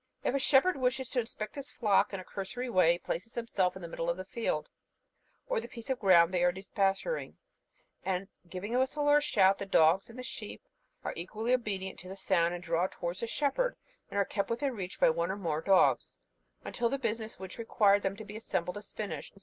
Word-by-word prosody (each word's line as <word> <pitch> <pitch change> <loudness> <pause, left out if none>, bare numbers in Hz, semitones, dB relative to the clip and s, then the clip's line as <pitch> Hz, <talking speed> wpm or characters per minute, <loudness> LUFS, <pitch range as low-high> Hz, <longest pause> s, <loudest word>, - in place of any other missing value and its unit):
If - - +1
a 275 - +2
shepherd 275 +6 +4
wishes 255 0 0
to 255 - +1
inspect 220 -2 -5
his 280 -1 -7
flock 210 -2 +2
in 195 - -4
a - - -7
cursory 240 +7 -5
way, 180 -4 +5
he - - -3
places 185 +5 -5
himself 195 -6 0
in 190 - -9
the - - -4
middle 165 0 -3
of 170 - 0
the 185 - -6
field, 225 -9 -2 0.8
or - - 0
the - - -8
piece 235 0 -7
of 260 - -1
ground 180 -3 +6
they 175 -1 +2
are 180 - +5
depasturing, 195 - -1 0.7
and 190 0 -1 0.2
giving 190 +6 -5
a 250 - +3
whistle 290 +3 0
or 290 0 +7
a - - +3
shout, 195 -9 +4
the 200 - -4
dogs 170 +3 +4
and 230 - -12
the 255 - -6
sheep - - -8 0.4
are - - -3
equally 215 +8 -2
obedient 195 -6 -2
to 185 - -10
the 190 - -6
sound, 180 -3 +2
and 175 - -7
draw 170 +1 +1
towards 175 0 -5
the 230 - -2
shepherd, 400 - 0 0.3
and - - -5
are 200 - +3
kept 200 0 -2
within 250 +4 -1
reach 190 -3 -6
by - - +6
one 170 +2 -1
or 190 - -2
more 160 -5 -1
dogs, 190 +2 +3 0.5
until 235 -1 0
the 275 - 0
business 225 -3 -3
which 190 +3 -8
required 205 -3 +4
them 195 0 -2
to 220 - -8
be 210 - -9
assembled 190 -4 -2
is 205 - -11
finished. 210 -1 -6
200 Hz, 225 wpm, -31 LUFS, 185-240 Hz, 0.8 s, or